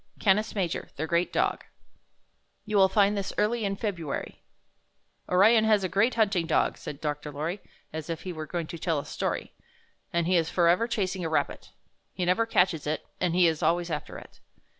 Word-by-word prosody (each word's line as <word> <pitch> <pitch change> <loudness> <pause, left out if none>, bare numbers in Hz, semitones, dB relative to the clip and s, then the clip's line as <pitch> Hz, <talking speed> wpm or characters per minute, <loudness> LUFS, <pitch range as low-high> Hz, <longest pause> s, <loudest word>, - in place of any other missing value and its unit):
CANIS 210 +2 +2
MAJOR, 185 -5 -2
THE 155 - -2
GREAT 170 +2 +1
DOG - - 0 1.0
You 210 -1 0
xcill 190 -1 +6
find 205 0 +4
this 200 -1 -3
early 220 +2 +1
in 195 -1 -1
February 180 -9 -4 0.9
"Orion 215 +5 +5
has 215 -2 +3
a - - +1
great 200 +7 +2
hunting 200 -7 +2
dog," 160 - +2
said 140 - -7
Dr. 150 -1 -3
Lorry, 160 +7 -4 0.3
as 160 0 -6
if 165 -1 -4
he 185 - -5
were 155 -1 -6
going 170 0 -3
to 170 +1 -8
tell 165 -1 0
a 140 - -3
story, - - -3 0.6
''and 170 -1 +1
he 180 +1 +3
is 165 -1 +1
forever 175 +6 +3
chasing 195 -5 -2
a 165 - -1
rabbit. 160 - -1 0.5
He 180 - -1
never 185 +6 +2
catches 180 -8 +2
it, 155 - -2
and 175 -2 0
he 180 -1 +5
is 160 -2 +1
always 170 +1 +1
after 150 -2 -4
it. - - -14
180 Hz, 190 wpm, -27 LUFS, 165-200 Hz, 1.0 s, xcill